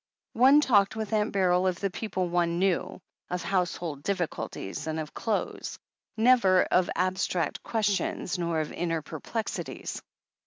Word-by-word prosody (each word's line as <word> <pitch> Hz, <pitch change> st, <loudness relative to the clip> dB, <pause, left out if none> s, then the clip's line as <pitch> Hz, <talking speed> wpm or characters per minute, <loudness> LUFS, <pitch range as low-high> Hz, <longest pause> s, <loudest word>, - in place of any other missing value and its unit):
One 265 Hz, +5 st, +6 dB
talked 205 Hz, -7 st, +3 dB
with 220 Hz, 0 st, -4 dB
Aunt 210 Hz, 0 st, +1 dB
Beryl 185 Hz, -1 st, +2 dB
of 180 Hz, -2 st, -1 dB
the 195 Hz, -2 st, -1 dB
people 185 Hz, -3 st, -2 dB
one 170 Hz, -1 st, +1 dB
knew, 185 Hz, -1 st, 0 dB, 0.3 s
of 180 Hz, -1 st, -3 dB
household 175 Hz, -5 st, -1 dB
difficulties, 165 Hz, -, -3 dB
and 160 Hz, 0 st, -2 dB
of 155 Hz, -1 st, -6 dB
clothes. 220 Hz, -3 st, -3 dB, 0.4 s
Never 220 Hz, -6 st, +5 dB
of 180 Hz, -1 st, +3 dB
abstract 185 Hz, -3 st, 0 dB
questions, 205 Hz, -4 st, -1 dB
nor 170 Hz, -2 st, 0 dB
of 155 Hz, -, -5 dB
inner 165 Hz, -2 st, -2 dB
perplexities. 215 Hz, +9 st, -5 dB
185 Hz, 140 wpm, -28 LUFS, 170-210 Hz, 0.4 s, One